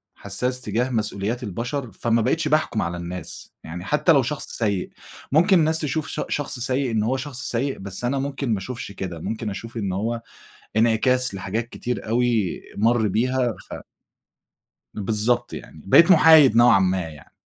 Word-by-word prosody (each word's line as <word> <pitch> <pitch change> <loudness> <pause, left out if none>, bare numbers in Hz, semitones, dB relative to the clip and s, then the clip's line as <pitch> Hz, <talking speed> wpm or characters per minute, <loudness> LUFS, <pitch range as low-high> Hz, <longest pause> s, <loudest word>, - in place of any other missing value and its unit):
حسّاس 125 +6 -1
تجاه 120 +3 -1
مسؤوليات 110 0 -2
البشر، 120 +5 -4
فما 115 +4 0
بقيتش 155 +7 0
باحكُم 150 -7 +1
على 85 +1 -3
الناس. 85 0 -7
يعني 90 +3 -8
حتى 150 +6 +2
لو 140 -4 +5
شخص 145 +4 -1
سيئ، 100 -5 -1 0.4
ممكن 175 +5 +4
الناس 160 0 +3
تشوف 155 0 -1
ش - - -3
شخص 145 -2 -1
سيئ 130 +1 0
إن 110 -2 0
هو 130 +4 0
شخص 130 -1 -3
سيئ، 130 +3 -1
بس 95 +4 -4
أنا 135 +3 0
ممكن 135 -2 -3
ما - - 0
اشوفش 115 +1 -7
كده، 95 -4 -6
ممكن 110 +5 -4
أشوف 115 +4 -7
إن 100 -3 -2
هو 115 +5 -2 0.6
إنعكاس 120 +2 +2
لحاجات 100 +5 -3
كتير 125 -2 -5
أوي 115 -4 0 0.2
مَر 110 0 +2
بيها، 125 +3 0 0.2
ف - - -5 1.2
بالضبط 115 +3 -1
يعني، 75 - -10
بقيت 170 - +6
محايد 160 -7 +7
نوعًا 120 -4 +6
ما 95 0 +1
يعني. 75 -2 -15
120 Hz, 165 wpm, -23 LUFS, 100-130 Hz, 1.2 s, محايد